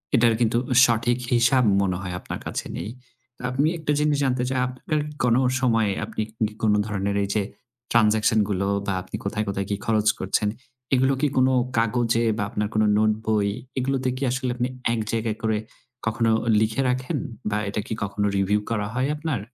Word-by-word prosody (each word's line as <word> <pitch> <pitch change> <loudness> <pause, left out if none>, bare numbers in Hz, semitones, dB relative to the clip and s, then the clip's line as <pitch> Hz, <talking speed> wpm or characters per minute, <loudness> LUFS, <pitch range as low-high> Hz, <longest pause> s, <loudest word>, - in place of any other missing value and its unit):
এটার 115 -2 +4
কিন্তু 115 0 +2 0.3
সঠিক 120 +1 +1 0.2
হিসাব 120 +2 +4 0.2
মনে 95 -2 0
হয় 90 -2 -5
আপনার - - -6
কাছে - - -3
নেই। - - -4 0.5
তো - - -14
আপনি 140 +4 +2
একটা 155 -2 -2
জিনিস 150 -1 +2
জানতে 130 -2 +1
চাই 130 -1 0
আপনার 140 +4 -2 0.2
কোন 120 -1 +4 0.2
সময় 115 -5 +2 0.2
আপনি 110 0 -4 0.3
কি 105 - -11
কোন 105 -1 +4
ধরনের 100 -1 -1
এই 100 - -3
যে 105 - +3 0.5
ট্রান্সেকশন 110 -1 +4
গুলো 100 -1 0 0.2
বা 100 - 0
আপনি 95 - -7
কোথায়, 105 +1 -1
কোথায় 100 -1 -2
কি 100 - 0
খরচ 110 -2 +1
করছেন 95 +2 0 0.5
এগুলো 130 +1 +4
কি 150 - +4
কোন 130 0 +5 0.3
কাগজে 115 +1 +2
বা - - 0
আপনার 105 0 -1
কোনো 110 0 +3
নোটবই 110 -1 +1 0.3
এগুলোতে 130 0 0
কি 135 - -3
আসলে 130 0 -1
আপনি 125 0 0 0.3
এক 115 - -1
জায়গায় 110 -1 -1
করে 110 -1 +1 0.5
কখনো 115 0 +1 0.3
লিখে 110 +4 +1
রাখেন 130 0 -1 0.3
বা 105 - 0
এটা 105 - -2
কি - - -3
কখনো 105 0 -1
রিভিউ 100 +2 +2
করা 105 -3 -1
হয় 125 +2 0
আপনার? 150 -5 -2
115 Hz, 180 wpm, -24 LUFS, 105-125 Hz, 0.5 s, কোন